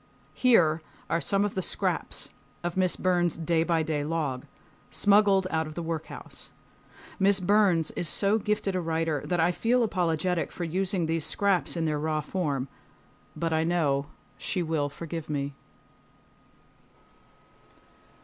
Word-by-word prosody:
Here 165 -11 +4 0.3
are 165 - +1
some 200 +3 +2
of 205 - -2
the 190 - -1
scraps - - -1 0.3
of 175 -1 -2
Miss 185 -1 +2
Burn's 175 -3 +1
day 165 0 +1
by 165 -1 +1
day 150 -2 -1
log, 145 -5 -2 0.4
smuggled 200 -2 +4
out 160 0 0
of 155 - -9
the 170 - -4
workhouse. 160 -1 -6 0.7
Miss 195 0 +4
Burns 185 -4 +3
is 170 - -1
so 200 +5 +3
gifted 210 -2 -1
a 180 - 0
writer 160 -3 -1
that 175 -1 -1
I 165 +2 +4
feel 240 +7 +2
apologetic 175 -3 0
for 175 - -5
using 180 +1 -1
these 165 -1 -1
scraps 190 -5 +1
in 165 - 0
their 150 -2 0
raw 155 0 -1
form, 145 -6 -2 0.7
but 165 -1 -1
I 160 0 +2
know 150 -5 +1 0.3
she 180 - -2
will 155 -3 -1
forgive 165 +1 -7
me. 140 -1 -2
170 Hz, 145 wpm, -27 LUFS, 160-185 Hz, 0.7 s, Here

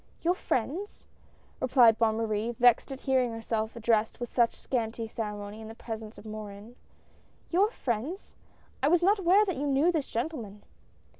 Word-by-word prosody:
"Your 345 +2 +3
friends?" 350 - -3 0.5
replied 240 -4 +5
Bonne 220 -2 +3
Marie, 225 +1 -1
vexed 245 +3 +4
at 270 - -7
hearing 255 -3 +1
herself 225 0 -3
addressed 225 -1 +1
with 240 - -4
such 235 -2 +3
scanty 230 -2 -3
ceremony 210 -1 -5
in 220 - -8
the 225 - -9
presence 220 -2 -7
of - - -12
Morin. 215 +1 -8 0.8
"Your 385 +5 +4
friends? 275 - -4 0.5
I 275 - +3
was 350 +3 +4
not 400 +3 +4
aware 385 +3 +5
that 370 -7 -2
you 290 +2 -1
knew 285 +5 +3
this 310 -5 -2
gentleman." 230 -6 -4
235 Hz, 160 wpm, -29 LUFS, 220-290 Hz, 0.8 s, replied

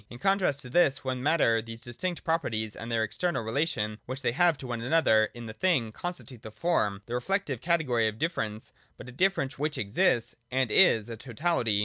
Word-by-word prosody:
In 120 - -9
contrast 180 -2 +1
to 125 - -9
this 140 -4 +3
one 130 -1 -2
Matter 130 -6 +3
these 115 0 -9
distinct 170 +10 -4
properties 115 - -1
and 115 +1 -7
their 115 -1 +1
external 115 - -1
relation 110 -3 -1
which 130 +3 -5
they - - +2
have 170 +4 +3
to 135 - -9
one 120 -2 -4
another 120 -5 +4
in 120 -1 -8
the 110 - -7
thing, 130 -7 +1
constitute 155 -5 -7
the - - -8
Form, 105 - 0
— - - -41
the 120 - -7
reflective 140 - -1
category 145 -10 +2
of 110 0 -4
differ 165 +7 -1
ence, 110 +1 -5 0.3
but 125 - -10
a - - -8
difference 145 -2 0
which 150 +1 -1
exists 115 - +1 0.2
and 130 -2 0
is 115 - +5
a 115 -1 -7
totality. 120 -3 0
125 Hz, 210 wpm, -28 LUFS, 115-165 Hz, 0.3 s, is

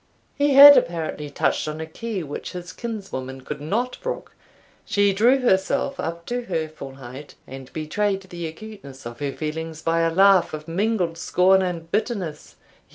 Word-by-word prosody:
He 285 -1 +2
had 285 0 +11
apparently 160 -8 -1
touched 145 - 0
on 155 +1 -5
a 160 - -4
key 200 +3 -5
which 145 -1 -7
his 180 -1 -7
kinswoman 190 - -6
could 145 +2 -7
not 230 - -2
brook. - - -5 0.5
She 205 -1 +2
drew 245 +7 +4
herself 250 +6 +1
up 170 +1 -4
to 245 0 -3
her 165 -5 -2
full 140 -4 -10
height, 135 +2 -11
and 135 -1 -10
betrayed 195 +5 -1
the 175 -3 -6
acuteness 160 - -11
of 120 0 -8
her 145 -1 -2
feelings 160 +2 -5
by 165 0 +1
a 165 0 +2
laugh 190 -1 +4
of 155 +1 -10
mingled 180 -2 -1
scorn 190 +2 +3
and 170 -3 -4
bitterness. 200 -7 -3
170 Hz, 165 wpm, -23 LUFS, 155-210 Hz, 0.5 s, had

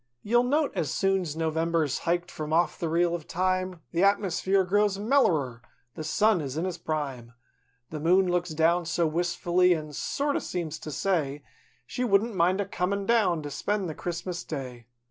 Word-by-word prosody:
215 210 - -8
You'll 240 +1 +4
note, 295 +1 +2
as 150 - -1
soon's 190 -5 0
November's 160 -2 0
hiked 175 +1 -1
from 155 0 -5
off 170 +2 +2
the 165 - -2
reel 170 +1 +2
of 170 -3 -5
Time, 185 -1 -1
The 175 +2 +1
atmosphere 195 -1 +2
grows 205 +1 +2
mellerer; 170 - +1 0.3
the 155 - -6
Sun 205 +4 +2
is 140 0 -5
in 165 - -1
his 180 -2 -4
prime; 135 -7 -4 0.3
/ 125 0 -44
The 155 - -4
Moon 180 +5 +3
looks 180 0 0
down 165 +2 +2
so 170 0 +1
wistfully 175 +2 +2
an' 155 -2 -6
sort 285 - -1
o' - - +2
seems 165 -3 -4
to - - -7
say 150 -5 -1 0.4
She 250 - -3
wouldn't 220 0 +2
mind 185 +1 +2
a 200 - 0
comin' 195 +1 -2
down 195 -8 +2
to 145 - -6
spend 205 +5 -1
the 160 - -4
Christmas 175 +2 -4
Day. 125 -6 -7
175 Hz, 185 wpm, -27 LUFS, 155-195 Hz, 0.4 s, You'll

